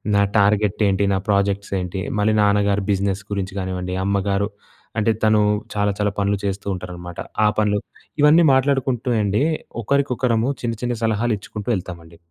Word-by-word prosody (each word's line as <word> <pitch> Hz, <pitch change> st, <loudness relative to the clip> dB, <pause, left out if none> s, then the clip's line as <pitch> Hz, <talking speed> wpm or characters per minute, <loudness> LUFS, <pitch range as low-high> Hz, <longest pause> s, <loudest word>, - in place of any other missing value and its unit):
నా 100 Hz, -, +4 dB, 0.2 s
టార్గెట్ 105 Hz, 0 st, +2 dB
ఏంటి? 100 Hz, 0 st, +1 dB
నా -, -, +2 dB
ప్రాజెక్ట్స్ 100 Hz, 0 st, +1 dB
ఏంటి? 90 Hz, +1 st, -4 dB, 0.2 s
మళ్ళీ 105 Hz, +1 st, +2 dB
నాన్నగారు 100 Hz, 0 st, +2 dB
బిజినెస్ 100 Hz, 0 st, 0 dB
గురించి 95 Hz, -1 st, -3 dB
కానివ్వండి, 90 Hz, -1 st, -3 dB
అమ్మగారు 100 Hz, 0 st, 0 dB, 0.5 s
అంటే 110 Hz, +1 st, +2 dB
తను 110 Hz, 0 st, +4 dB, 0.3 s
చాలా 105 Hz, -1 st, +1 dB
చాలా 105 Hz, -1 st, 0 dB
పనులు 100 Hz, 0 st, +1 dB
చేస్తూ 100 Hz, 0 st, -3 dB
ఉంటారనమాట 90 Hz, -1 st, -8 dB, 0.3 s
ఆ -, -, +6 dB
పనులు. 105 Hz, -1 st, +2 dB, 0.4 s
ఇవన్నీ 150 Hz, +3 st, +6 dB
మాట్లాడుకుంటూ 130 Hz, -2 st, +1 dB
అండి 105 Hz, +5 st, +1 dB, 0.4 s
ఒకరికొకరము 125 Hz, -2 st, +1 dB
చిన్న 120 Hz, -1 st, -1 dB
చిన్న 120 Hz, -1 st, -1 dB
సలహాలు 115 Hz, +1 st, +1 dB
ఇచ్చుకుంటూ 105 Hz, +2 st, -7 dB
ఎళ్తామండి. 85 Hz, -3 st, -9 dB
100 Hz, 145 wpm, -21 LUFS, 95-110 Hz, 0.5 s, ఆ